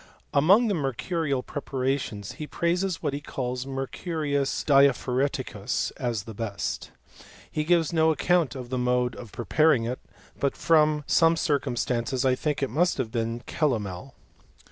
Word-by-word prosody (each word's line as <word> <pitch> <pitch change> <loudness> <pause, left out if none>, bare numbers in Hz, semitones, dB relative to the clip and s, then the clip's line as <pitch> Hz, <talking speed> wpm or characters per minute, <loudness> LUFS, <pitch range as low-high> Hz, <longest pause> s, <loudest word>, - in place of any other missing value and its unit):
Among 190 +12 +5
the 205 - +1
mercurial 140 -1 -1
preparations, 130 -7 -3
he 150 - -7
praises 175 +2 -1
what 140 - 0
he 145 - -4
calls 125 -2 -4
me, 135 - -6
rcurius 140 0 -2
diaphoreticus 135 -1 +2
as 115 -5 -2
the 110 - -9
best. 105 -2 -4 0.6
He 155 - -1
gives 165 0 +2
no 160 -1 +4
account 165 -2 +2
of 125 -2 -7
the 130 - -1
mode 125 -1 +1
of 120 -4 -10
preparing 150 +1 +2
it; 125 +3 -3 0.4
but 140 - 0
from 155 -2 +3
some 165 +2 +4
circumstances. 130 -4 0
I 130 - +4
think 145 +2 -1
it 135 - -1
must 175 +7 +2
have 125 -5 -2
been 115 +1 -2
calomel 120 - -2
135 Hz, 145 wpm, -26 LUFS, 125-155 Hz, 0.6 s, Among